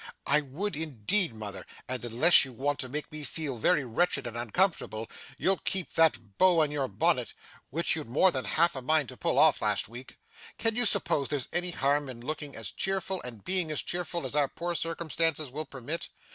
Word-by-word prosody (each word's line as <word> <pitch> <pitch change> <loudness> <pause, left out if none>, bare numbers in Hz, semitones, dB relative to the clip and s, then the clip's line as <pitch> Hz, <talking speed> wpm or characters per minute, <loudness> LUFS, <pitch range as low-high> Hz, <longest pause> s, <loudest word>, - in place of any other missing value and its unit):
'I 150 +2 +3
would, 185 +7 -2
indeed, 155 - 0
mother, 100 -4 -7 0.2
and 125 -2 -4
unless 120 +9 +6
you 130 -3 -7
want 145 +4 -2
to 130 - -2
make 150 +5 -4
me 155 0 -6
feel 140 -2 -4
very 150 +3 +2
wretched 140 +4 0
and 120 -1 -6
uncomfortable, 120 - -1 0.3
you'll 190 +5 +1
keep 190 -3 -2
that 120 -11 +1
bow 180 -3 +5
on 150 - -2
your 140 -3 -1
bonnet, 100 - 0 0.4
which 165 +5 +3
you'd 155 -6 -4
more 150 +10 +4
than 130 -4 -3
half 170 +1 +2
a 130 - -4
mind 150 -1 +1
to - - -7
pull - - -1
off - - +5
last - - 0
week. 120 +4 -11 0.4
Can 225 -1 +2
you 245 -1 +5
suppose 140 -7 +1
there's 145 -4 -1
any 175 +1 +1
harm 145 -3 0
in 125 -2 -8
looking 145 +2 -5
as 110 -4 -3
cheerful 190 -1 -1
and 115 -5 -9
being 185 -3 +2
as 155 - +1
cheerful 175 -3 -2
as 130 - -4
our 145 -2 +3
poor 175 +5 -4
circumstances 165 -3 -1
will 155 +4 -3
permit? 140 +4 -6
150 Hz, 200 wpm, -29 LUFS, 125-170 Hz, 0.4 s, unless